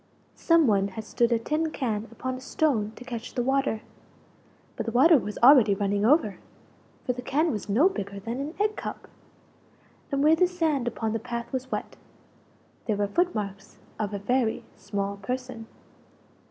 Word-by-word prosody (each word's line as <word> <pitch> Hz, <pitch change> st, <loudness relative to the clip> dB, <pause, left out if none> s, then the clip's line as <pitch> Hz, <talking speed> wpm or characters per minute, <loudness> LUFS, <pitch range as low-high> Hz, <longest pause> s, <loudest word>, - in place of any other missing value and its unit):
Some 330 Hz, -2 st, +4 dB
one 200 Hz, -4 st, +3 dB
had 200 Hz, +3 st, -7 dB
stood 235 Hz, +2 st, +1 dB
a 235 Hz, -, +4 dB
tin 305 Hz, +7 st, -1 dB
can 225 Hz, -7 st, -3 dB
upon 255 Hz, 0 st, -4 dB
a 255 Hz, -, -7 dB
stone 260 Hz, -7 st, 0 dB
to 250 Hz, -, -11 dB
catch 235 Hz, -1 st, -7 dB
the 245 Hz, -, 0 dB
water 265 Hz, -4 st, 0 dB, 0.9 s
but -, -, -4 dB
the -, -, -1 dB
water 285 Hz, +6 st, +6 dB
was 210 Hz, -1 st, -6 dB
already 245 Hz, -6 st, +7 dB
running 200 Hz, +1 st, 0 dB
over, 240 Hz, -, +3 dB, 0.7 s
for 250 Hz, -, 0 dB
the 250 Hz, -, -6 dB
can 305 Hz, +6 st, +1 dB
was 210 Hz, -2 st, -5 dB
no 250 Hz, -, +5 dB
bigger 200 Hz, -, -4 dB
than 230 Hz, +5 st, -5 dB
an 295 Hz, +4 st, -5 dB
egg 425 Hz, +1 st, +1 dB
cup! -, -, -6 dB, 1.0 s
And 275 Hz, 0 st, +1 dB
where 310 Hz, +2 st, +6 dB
the 365 Hz, +2 st, +3 dB
sand 320 Hz, -8 st, 0 dB
upon 225 Hz, -1 st, -2 dB
the 225 Hz, -, -1 dB
path 235 Hz, +1 st, -6 dB
was 260 Hz, 0 st, -4 dB
wet -, -, -4 dB, 0.9 s
there 215 Hz, -3 st, 0 dB
were 205 Hz, -, +1 dB
foot 355 Hz, -, +1 dB
marks 200 Hz, -2 st, -5 dB, 0.2 s
of 210 Hz, -2 st, -2 dB
a 205 Hz, -, -3 dB
very 230 Hz, +3 st, 0 dB
small 200 Hz, 0 st, -4 dB
person. 250 Hz, +2 st, -5 dB
240 Hz, 180 wpm, -26 LUFS, 210-275 Hz, 1.0 s, already